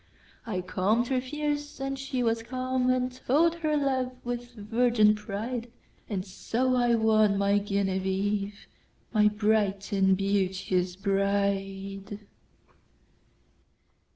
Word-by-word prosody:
I 185 Hz, -5 st, -2 dB
calm'd 200 Hz, +6 st, 0 dB
her 260 Hz, -1 st, +1 dB
fears, 295 Hz, +2 st, -3 dB
and 270 Hz, 0 st, -3 dB
she 265 Hz, -2 st, -2 dB
was 230 Hz, -1 st, +1 dB
calm. 255 Hz, +1 st, -1 dB
And 255 Hz, 0 st, +1 dB
told 290 Hz, +6 st, +2 dB
her 310 Hz, -2 st, 0 dB
love 260 Hz, -3 st, 0 dB
with 245 Hz, 0 st, -5 dB
virgin 220 Hz, 0 st, +3 dB
pride; 220 Hz, +3 st, -4 dB, 0.4 s
And 195 Hz, -3 st, -2 dB
so 245 Hz, +6 st, -1 dB
I 240 Hz, -1 st, +3 dB
won 215 Hz, -2 st, +3 dB
my 200 Hz, +1 st, +3 dB
Genevieve, 200 Hz, 0 st, -1 dB, 0.5 s
My 210 Hz, -1 st, +5 dB
bright 210 Hz, -1 st, +1 dB
and 190 Hz, -1 st, +3 dB
beauteous 185 Hz, -2 st, 0 dB
Bride. 195 Hz, 0 st, -1 dB
215 Hz, 110 wpm, -28 LUFS, 195-250 Hz, 0.5 s, My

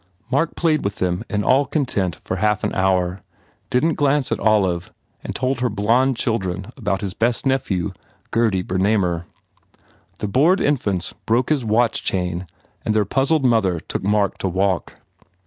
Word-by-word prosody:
Mark 145 Hz, +5 st, +1 dB
played 155 Hz, -3 st, +1 dB
with 100 Hz, 0 st, -2 dB
them 90 Hz, +2 st, -1 dB
in 105 Hz, -1 st, -1 dB
all 135 Hz, +6 st, +4 dB
content 105 Hz, -, -1 dB
for 95 Hz, -, -5 dB
half 105 Hz, +1 st, +1 dB
an -, -, -1 dB
hour, 95 Hz, -1 st, +1 dB, 0.5 s
didn 125 Hz, +6 st, +2 dB
t 165 Hz, -, -1 dB
glance 145 Hz, -2 st, +1 dB
at -, -, 0 dB
Olive, 95 Hz, -5 st, +1 dB, 0.3 s
and -, -, -5 dB
told 130 Hz, +1 st, 0 dB
her 125 Hz, 0 st, +1 dB
blond 115 Hz, +5 st, +2 dB
children 95 Hz, -3 st, -2 dB
about 100 Hz, -7 st, -2 dB
his 95 Hz, -2 st, -3 dB
best 115 Hz, +5 st, 0 dB
nephew, 115 Hz, -10 st, 0 dB, 0.4 s
Gurdy 110 Hz, -6 st, +2 dB
Bernamer. 95 Hz, -2 st, 0 dB, 0.9 s
The -, -, -3 dB
bored 155 Hz, -, +3 dB
infants 100 Hz, -11 st, 0 dB
broke 120 Hz, +3 st, +2 dB
his 150 Hz, -4 st, +1 dB
watch 115 Hz, +1 st, +2 dB
chain 90 Hz, -1 st, -2 dB, 0.4 s
and 110 Hz, -, 0 dB
their 105 Hz, -1 st, +3 dB
puzzled 135 Hz, +6 st, +1 dB
mother 105 Hz, -8 st, +2 dB
took -, -, -5 dB
Mark 100 Hz, 0 st, +1 dB
to -, -, -1 dB
walk. 95 Hz, 0 st, 0 dB
105 Hz, 165 wpm, -21 LUFS, 95-130 Hz, 0.9 s, all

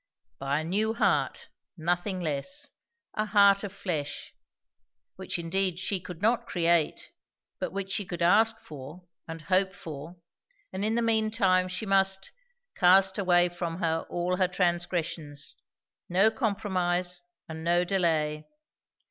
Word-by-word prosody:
By 140 Hz, +2 st, 0 dB
a -, -, -5 dB
new 210 Hz, +7 st, 0 dB
heart, 235 Hz, -, +1 dB, 0.3 s
nothing 175 Hz, +3 st, -1 dB
less; 225 Hz, -, -3 dB, 0.4 s
a 215 Hz, -, 0 dB
heart 200 Hz, -1 st, +5 dB
of 200 Hz, -, -4 dB
flesh; 160 Hz, -7 st, -4 dB, 0.8 s
which -, -, -4 dB
indeed 180 Hz, +1 st, 0 dB
she 185 Hz, +1 st, -1 dB
could 180 Hz, 0 st, -10 dB
not 235 Hz, +1 st, +2 dB
create, 170 Hz, -3 st, +1 dB, 0.5 s
but -, -, -3 dB
which 195 Hz, +1 st, -4 dB
she 200 Hz, 0 st, -1 dB
could 175 Hz, -1 st, -4 dB
ask 225 Hz, +5 st, +4 dB
for 150 Hz, +4 st, -10 dB, 0.2 s
and 165 Hz, -1 st, -7 dB
hope 190 Hz, +3 st, +1 dB
for; 155 Hz, +1 st, -8 dB, 0.6 s
and 190 Hz, +1 st, -3 dB
in 220 Hz, +2 st, +1 dB
the 235 Hz, -, +1 dB
mean 220 Hz, -1 st, +2 dB
time 185 Hz, -5 st, +2 dB
she 185 Hz, +4 st, -4 dB
must 195 Hz, -1 st, +2 dB, 0.4 s
"cast 190 Hz, +2 st, +5 dB
away 175 Hz, -2 st, +4 dB
from 175 Hz, -1 st, -4 dB
her 165 Hz, -2 st, -1 dB
all 175 Hz, +1 st, -1 dB
her 185 Hz, -1 st, +3 dB
transgressions." 170 Hz, -5 st, -2 dB, 0.5 s
No 195 Hz, +5 st, +4 dB
compromise, 185 Hz, -6 st, -1 dB, 0.3 s
and 160 Hz, 0 st, -7 dB
no 175 Hz, +1 st, +3 dB
delay. 160 Hz, -5 st, 0 dB
180 Hz, 140 wpm, -28 LUFS, 170-200 Hz, 0.8 s, heart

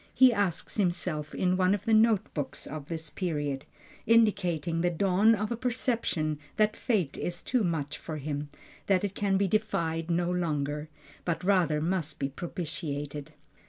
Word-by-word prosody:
he 260 Hz, -2 st, +7 dB
asks 200 Hz, -4 st, -1 dB
himself 175 Hz, -5 st, 0 dB
in 185 Hz, 0 st, +2 dB
one 185 Hz, +1 st, +3 dB
of 205 Hz, -, -7 dB
the 225 Hz, -, +2 dB
note 220 Hz, -2 st, +4 dB
books 145 Hz, -3 st, -4 dB
of 150 Hz, -1 st, -7 dB
this 165 Hz, -1 st, -5 dB
period, 145 Hz, -7 st, -2 dB, 0.4 s
indicating 180 Hz, -8 st, +3 dB
the 175 Hz, -, +3 dB
dawn 195 Hz, +5 st, +4 dB
of 215 Hz, +1 st, -3 dB
a -, -, +1 dB
perception 230 Hz, -, -1 dB, 0.2 s
that 215 Hz, 0 st, +3 dB
fate 190 Hz, -, 0 dB
is 175 Hz, 0 st, -3 dB
too 250 Hz, -3 st, +1 dB
much 155 Hz, -5 st, -2 dB
for 155 Hz, -2 st, -5 dB
him, 145 Hz, 0 st, -4 dB, 0.4 s
that 195 Hz, 0 st, +3 dB
it 200 Hz, -1 st, -1 dB
can 195 Hz, -1 st, +1 dB
be 200 Hz, 0 st, +2 dB
defied 170 Hz, -6 st, 0 dB
no 175 Hz, +1 st, +1 dB
longer, 150 Hz, -4 st, -1 dB, 0.3 s
but 170 Hz, 0 st, -2 dB
rather 180 Hz, -6 st, +3 dB
must 160 Hz, -2 st, -1 dB
be 135 Hz, -, -1 dB
propitiated. 150 Hz, -2 st, -5 dB
175 Hz, 160 wpm, -29 LUFS, 155-200 Hz, 0.4 s, he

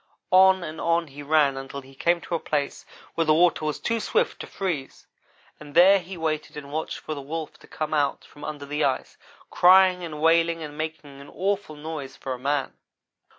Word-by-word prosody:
On 190 Hz, 0 st, +6 dB
and 155 Hz, -1 st, -6 dB
on 170 Hz, -1 st, +1 dB
he 140 Hz, +1 st, -10 dB
ran 145 Hz, -2 st, +3 dB
until 135 Hz, +1 st, -7 dB
he 135 Hz, 0 st, -16 dB
came 170 Hz, +5 st, +1 dB
to -, -, -7 dB
a 165 Hz, -, +1 dB
place 145 Hz, -3 st, -3 dB, 0.3 s
where 165 Hz, -, 0 dB
the 155 Hz, 0 st, +4 dB
water 170 Hz, -1 st, +3 dB
was 150 Hz, -, -2 dB
too 230 Hz, 0 st, -1 dB
swift 460 Hz, -, 0 dB
to -, -, -7 dB
freeze, 170 Hz, -9 st, -4 dB, 0.5 s
and 145 Hz, -1 st, -12 dB
there 190 Hz, +3 st, +7 dB
he 180 Hz, +1 st, -9 dB
waited 155 Hz, -2 st, -3 dB
and 140 Hz, -1 st, -8 dB
watched 155 Hz, +2 st, -3 dB
for 155 Hz, -, -6 dB
the 145 Hz, -, -6 dB
Wolf 155 Hz, +2 st, -6 dB
to -, -, -17 dB
come 155 Hz, 0 st, -4 dB
out 145 Hz, -2 st, 0 dB
from 145 Hz, -, -15 dB
under 150 Hz, -2 st, -6 dB
the 150 Hz, +2 st, -2 dB
ice, 130 Hz, -2 st, -1 dB, 0.3 s
crying 185 Hz, 0 st, +6 dB
and 155 Hz, -3 st, -6 dB
wailing 165 Hz, +1 st, +3 dB
and 150 Hz, -1 st, -8 dB
making 155 Hz, -3 st, -6 dB
an 140 Hz, -, -12 dB
awful 195 Hz, -4 st, -2 dB
noise, 150 Hz, -3 st, -7 dB
for 130 Hz, -, -4 dB
a 125 Hz, -, -7 dB
man. 140 Hz, +1 st, -1 dB
155 Hz, 205 wpm, -25 LUFS, 145-170 Hz, 0.5 s, there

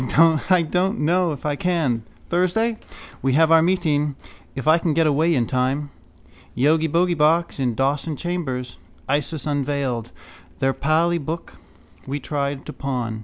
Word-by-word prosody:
—I 180 Hz, -2 st, +5 dB
don't 180 Hz, +6 st, 0 dB
know 175 Hz, +3 st, +2 dB
if 145 Hz, -2 st, -7 dB
I 150 Hz, -1 st, 0 dB
can. 155 Hz, -9 st, 0 dB, 0.3 s
Thursday. 215 Hz, +6 st, +1 dB, 0.4 s
We 135 Hz, -1 st, +1 dB
have 160 Hz, +3 st, +4 dB
our 165 Hz, 0 st, +7 dB
meeting. 155 Hz, -5 st, +1 dB, 0.4 s
If 135 Hz, +2 st, -5 dB
I 160 Hz, +2 st, +6 dB
can 165 Hz, -3 st, 0 dB
get 165 Hz, 0 st, +3 dB
away 155 Hz, +3 st, +2 dB
in 120 Hz, -3 st, +1 dB
time. 135 Hz, +4 st, -1 dB, 0.7 s
Yogibogeybox 160 Hz, +3 st, +2 dB
in 125 Hz, -4 st, 0 dB
Dawson 145 Hz, +4 st, 0 dB
chambers. 135 Hz, -7 st, -4 dB, 0.3 s
Isis 145 Hz, +2 st, -1 dB
Unveiled. 140 Hz, -5 st, -2 dB, 0.5 s
Their 135 Hz, 0 st, +1 dB
Pali 165 Hz, +5 st, +1 dB
book 160 Hz, +3 st, -6 dB, 0.5 s
we 140 Hz, +2 st, -3 dB
tried 140 Hz, 0 st, -3 dB
to 150 Hz, -, -7 dB
pawn. 125 Hz, -5 st, -3 dB
150 Hz, 140 wpm, -22 LUFS, 135-170 Hz, 0.7 s, our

